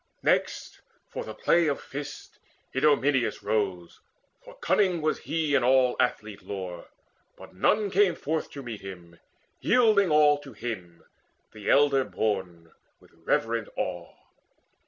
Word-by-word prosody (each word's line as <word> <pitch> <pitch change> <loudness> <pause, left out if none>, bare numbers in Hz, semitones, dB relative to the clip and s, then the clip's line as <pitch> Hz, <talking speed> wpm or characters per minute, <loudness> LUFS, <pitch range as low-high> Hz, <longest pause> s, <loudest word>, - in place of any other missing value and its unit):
Next, - - 0 0.3
for - - -5
the 110 - -8
play 170 +8 +3
of 145 - 0
fists 145 +1 -8 0.3
Idomeneus 135 -2 +2
rose, 100 -5 -2 0.4
For - - -13
cunning 195 - +2
was 155 0 0
he 155 -3 -2
in 140 - +3
all 130 0 +4
athlete 110 -4 -1
lore; 90 -3 -7 0.5
But - - -13
none 200 - +1
came 185 -2 +3
forth 160 +1 -3
to 140 - -7
meet 115 -4 -7
him, 90 -3 -11 0.4
yielding 215 -6 +4
all 150 -1 +5
To 140 -3 -12
him, 95 -7 -7 0.5
the 105 -2 -6
elder 140 -1 +4
born, 95 -8 -3 0.3
with - - -22
reverent 115 -1 0
awe. 90 -2 -4
130 Hz, 135 wpm, -27 LUFS, 100-150 Hz, 0.5 s, all